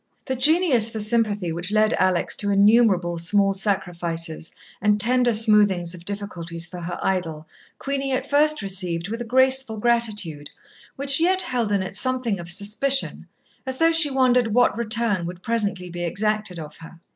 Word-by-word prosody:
The 260 - -3
genius 275 -4 +3
for 225 - -6
sympathy 210 -4 -1
which 175 +4 -3
led 215 0 +2
Alex 185 -2 0
to 205 - 0
innumerable 200 -4 +2
small 195 +4 +1
sacrifices 175 -5 -3 0.3
and 210 +1 +1
tender 245 +3 +3
smoothings 205 -6 +3
of 175 -1 -12
difficulties 175 -5 -4
for 180 +1 -9
her 175 +1 -6
idol, 165 -5 -3 0.3
Queenie 275 0 -4
at 260 +1 -3
first 300 -3 +1
received 180 -2 -3
with 230 +2 -5
a - - -5
graceful 260 -1 +2
gratitude 210 -10 -1 0.5
which 275 +1 +1
yet 370 +3 +1
held 240 -4 -3
in 200 -2 0
it 190 +1 -7
something 250 -3 0
of 170 0 -8
suspicion, 210 +9 0 0.4
as 260 -1 -6
though 330 +2 +3
she 325 -2 +7
wondered 250 -3 +2
what 245 -4 +2
return 230 -4 0
would 180 +1 -10
presently 205 -6 -2
be 175 0 -6
exacted 210 +1 -2
of 155 -2 -10
her. 165 +1 -14
210 Hz, 165 wpm, -22 LUFS, 180-245 Hz, 0.5 s, she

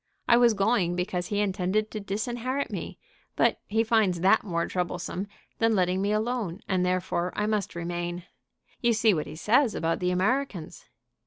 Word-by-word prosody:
I 235 - +6
was 240 -2 +5
going 195 -4 +2
because 180 0 -2
he 205 +1 0
intended 195 +2 0
to 215 - -4
disinherit 240 +7 -3
me; - - -5 0.4
but - - +2
he 220 +2 +2
finds 215 -6 +2
that 195 +4 +4
more 170 -4 -1
troublesome 180 +1 -3 0.3
than 225 -1 +3
letting 185 0 +1
me 200 +1 0
alone, 215 -4 -1
and 185 -2 +1
therefore 180 -1 0
I 210 - 0
must 210 -4 -1
remain. 175 +1 -4 0.6
You 235 -1 +3
see 220 -1 +4
what 155 -4 -2
he - - -8
says 225 - +2
about 165 0 0
the 180 - 0
Americans." 195 - -1
195 Hz, 170 wpm, -27 LUFS, 180-220 Hz, 0.6 s, I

